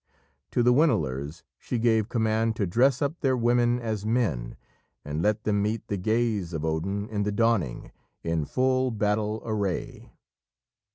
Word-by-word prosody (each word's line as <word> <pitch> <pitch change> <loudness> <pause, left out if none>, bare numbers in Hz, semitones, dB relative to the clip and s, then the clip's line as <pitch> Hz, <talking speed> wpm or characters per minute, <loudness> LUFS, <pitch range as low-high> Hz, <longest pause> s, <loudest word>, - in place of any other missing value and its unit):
To 120 - +1
the 125 +1 +5
Winilers, 75 - +1 0.2
she 125 - -3
gave 110 -2 +2
command 110 -1 +1
to 105 - 0
dress 125 +11 +2
up 145 +4 -2
their 130 -3 +1
women 120 0 +2
as 110 -4 -3
men, 105 - -1 0.5
and 75 +2 -3
let 105 +3 +1
them 105 -1 +1
meet 105 +2 -2
the 100 - -1
gaze 110 -3 0
of 80 -1 -3
Odin 95 +6 -2
in 105 -2 -2
the 105 0 0
dawning, 100 - 0 0.3
in 80 -2 -1
full 130 - +1
battle 105 0 -1
array. 100 -5 -3
110 Hz, 155 wpm, -26 LUFS, 95-120 Hz, 0.5 s, the